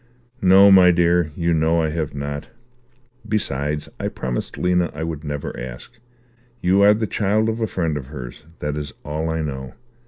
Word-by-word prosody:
"No, 95 Hz, +2 st, +7 dB
my 95 Hz, -2 st, +8 dB
dear, 85 Hz, -1 st, +3 dB
you 85 Hz, 0 st, 0 dB
know 80 Hz, +1 st, +2 dB
I 80 Hz, -, 0 dB
have 75 Hz, -2 st, -3 dB
not. 70 Hz, +1 st, -5 dB, 0.8 s
Besides, 75 Hz, -8 st, -1 dB
I -, -, -2 dB
promised 60 Hz, -2 st, -4 dB
Lena 90 Hz, -1 st, +1 dB
I 80 Hz, -, -4 dB
would 80 Hz, -2 st, -4 dB
never 75 Hz, -1 st, -4 dB
ask. 65 Hz, -, -9 dB, 0.6 s
You 95 Hz, +2 st, +3 dB
are 105 Hz, +1 st, +6 dB
the 110 Hz, +1 st, -1 dB
child 105 Hz, +2 st, +1 dB
of 110 Hz, +1 st, -3 dB
a 110 Hz, -, +1 dB
friend 85 Hz, -6 st, -1 dB
of 65 Hz, -3 st, -7 dB
hers. 65 Hz, -2 st, -8 dB, 0.2 s
That 75 Hz, 0 st, -2 dB
is 75 Hz, -2 st, -5 dB
all 80 Hz, +2 st, -2 dB
I 80 Hz, 0 st, -1 dB
know. 65 Hz, -3 st, -6 dB
80 Hz, 180 wpm, -21 LUFS, 75-95 Hz, 0.8 s, my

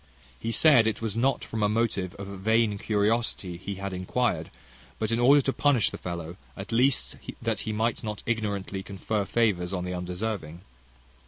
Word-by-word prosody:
He 115 Hz, -, -2 dB
said, 120 Hz, -4 st, +6 dB
it 110 Hz, -1 st, 0 dB
was 110 Hz, -2 st, -2 dB
not 130 Hz, +4 st, +1 dB
from 110 Hz, -, -4 dB
a 105 Hz, -, +3 dB
motive 105 Hz, -5 st, 0 dB
of 100 Hz, -, -7 dB
vain 105 Hz, +2 st, +1 dB
curiosity 105 Hz, -3 st, 0 dB
he 95 Hz, +3 st, -5 dB
had 100 Hz, 0 st, -5 dB
inquired, 90 Hz, -2 st, -1 dB, 0.5 s
but 110 Hz, 0 st, -1 dB
in 115 Hz, -, +1 dB
order 140 Hz, +3 st, +6 dB
to 135 Hz, -, 0 dB
punish 140 Hz, -7 st, +3 dB
the -, -, -7 dB
fellow; 85 Hz, 0 st, -5 dB, 0.2 s
at 95 Hz, -1 st, -7 dB
least, 125 Hz, +3 st, +2 dB, 0.2 s
that -, -, -1 dB
he 110 Hz, -, -3 dB
might 110 Hz, +2 st, -1 dB
not 105 Hz, -2 st, -5 dB
ignorantly 100 Hz, -4 st, -2 dB
confer 100 Hz, +2 st, -2 dB
favours 95 Hz, -6 st, +1 dB
on 90 Hz, -1 st, -2 dB
the 90 Hz, -, -3 dB
undeserving. 90 Hz, -1 st, -4 dB
105 Hz, 175 wpm, -27 LUFS, 95-115 Hz, 0.5 s, said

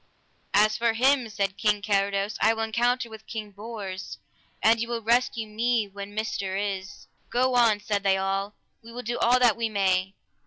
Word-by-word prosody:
As 215 Hz, +1 st, +4 dB
for 230 Hz, -1 st, +2 dB
him, 255 Hz, +1 st, +2 dB
said 200 Hz, -2 st, -2 dB
King 210 Hz, -2 st, +1 dB
Carados, 200 Hz, 0 st, 0 dB
I 225 Hz, +1 st, +4 dB
will 225 Hz, -, -2 dB
encounter 240 Hz, +2 st, +1 dB
with 220 Hz, -1 st, -12 dB
King 215 Hz, -2 st, -6 dB
Bors, 200 Hz, -3 st, -7 dB, 0.5 s
an 225 Hz, +1 st, +5 dB
ye 230 Hz, -, -2 dB
will 235 Hz, -1 st, -3 dB
rescue 235 Hz, 0 st, +1 dB
me 225 Hz, 0 st, 0 dB
when 200 Hz, +1 st, -9 dB
myster 200 Hz, -3 st, -2 dB
is. 195 Hz, -2 st, -4 dB, 0.2 s
Go 255 Hz, +1 st, +1 dB
on, 230 Hz, -4 st, +4 dB
said 205 Hz, -1 st, -1 dB
they 195 Hz, -1 st, +2 dB
all, 195 Hz, +1 st, -2 dB, 0.3 s
we 230 Hz, -, -12 dB
will 245 Hz, +1 st, -7 dB
do 240 Hz, +1 st, -3 dB
all 245 Hz, +2 st, +4 dB
that 245 Hz, -3 st, +4 dB
we 230 Hz, -1 st, -1 dB
may. 195 Hz, -2 st, +1 dB
215 Hz, 185 wpm, -26 LUFS, 200-235 Hz, 0.5 s, an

